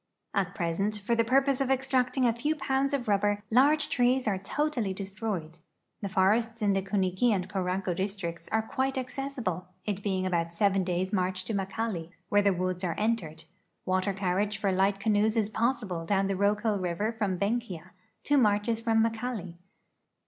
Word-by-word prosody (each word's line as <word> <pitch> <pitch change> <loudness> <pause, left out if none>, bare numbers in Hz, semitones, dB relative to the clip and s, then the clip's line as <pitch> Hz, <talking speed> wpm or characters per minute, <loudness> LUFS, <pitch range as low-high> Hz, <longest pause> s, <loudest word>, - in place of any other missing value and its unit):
At 195 -1 0
present, 195 +3 -1
for 210 +4 -1
the 230 0 +3
purpose 270 +3 +2
of 265 - 0
extract 265 -1 +1
ing 260 - +3
a 235 - +3
few 295 +7 -1
pounds 270 -1 0
of 275 -5 -1
rubber, 205 0 +1
large 285 +6 +4
trees 250 0 +2
are 195 -3 +1
totally 235 -2 -1
destroyed. 195 -4 -4 0.4
The 200 - -3
forests 220 +5 +2
in 200 -1 +3
the 195 - +1
Kuniki 190 +3 +1
and 190 -3 0
Koranko 185 -2 -1
districts 190 -3 -4
are 220 0 +2
quite 265 +4 -1
ac 255 -1 -3
cessible, 225 -11 -3 0.2
it 205 -2 -2
being 190 -2 -1
about 170 -2 -1
seven 195 0 +2
da3^s' 185 +2 -1
march 185 -1 0
to 220 - -2
Makali, 195 -3 -2 0.2
where 205 - +4
the 200 0 +3
woods 185 0 -2
are 170 -3 -1
entered. 210 -8 -1 0.4
Water 185 +2 +1
carriage 195 +2 -1
for 200 -1 0
light 195 +1 +2
canoes 215 +2 +2
is 215 -2 +2
possible 220 -7 -1
down 195 +3 +1
the 195 0 0
Rokel 205 +2 +1
river 185 +4 -1
from 205 -5 -1
Benkia, 200 -4 -2 0.3
two 290 -1 +3
marches 215 0 +2
from 225 -1 +3
Makali. 225 -5 -3
205 Hz, 180 wpm, -29 LUFS, 185-230 Hz, 0.4 s, large